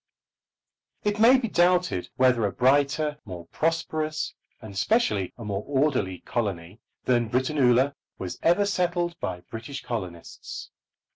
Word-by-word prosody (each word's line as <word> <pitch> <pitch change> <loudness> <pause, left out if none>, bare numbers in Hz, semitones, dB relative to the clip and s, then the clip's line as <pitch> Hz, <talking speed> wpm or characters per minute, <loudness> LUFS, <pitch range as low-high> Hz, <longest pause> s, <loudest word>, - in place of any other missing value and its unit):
It 210 0 0
may 240 +4 +7
be 250 -2 -1
doubted 180 - +2
whether 125 -3 +3
a - - -3
brighter, 145 +4 +2
more 90 -4 -8
prosperous, 155 - -1 0.3
and 110 -3 -10
specially 105 - +1
a 115 - -8
more 100 0 -3
orderly 130 - 0
colony 100 -4 -3 0.2
than 120 -3 +2
Britannula 130 +1 +3 0.2
was 90 -2 -6
ever 175 +5 +4
settled 175 -3 0
by 90 -1 -4
British 115 +8 -8
colonists. 90 -8 -6
130 Hz, 125 wpm, -26 LUFS, 105-165 Hz, 0.3 s, may